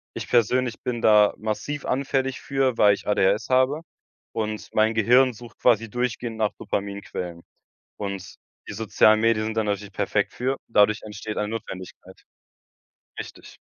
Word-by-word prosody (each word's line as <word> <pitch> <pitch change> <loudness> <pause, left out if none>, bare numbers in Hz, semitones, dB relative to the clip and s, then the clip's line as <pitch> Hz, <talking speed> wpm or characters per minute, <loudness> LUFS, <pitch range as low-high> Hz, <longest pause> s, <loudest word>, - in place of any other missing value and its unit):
Ich - - -5
persönlich 120 +1 +1
bin 120 -2 -3
da 105 -1 +6
massiv 110 +7 -4
anfällig 135 0 -1
für, 135 -3 0
weil 100 -1 +6
ich - - -13
ADHS 105 +2 +2
habe 130 +4 +3 0.5
und 110 -1 -3
mein 110 +1 +3
Gehirn 125 +4 +4
sucht 120 +1 -13
quasi 115 -2 +3
durchgehend 120 0 -3
nach 110 -2 0
Dopaminquellen. 100 -4 -4 0.6
Und 100 -2 -5 0.3
die - - -6
sozialen 110 0 +4
Medien 115 -1 +2
sind 110 0 -4
dann 110 - +1
natürlich 100 -1 -3
perfekt - - 0
für 130 +2 -1
und - - -9
dadurch 105 -1 +3
entsteht 105 0 -6
eine 105 0 -1
Notwendigkeit. 95 -5 -8 1.0
Richtig. - - -9
110 Hz, 150 wpm, -24 LUFS, 105-125 Hz, 1.0 s, da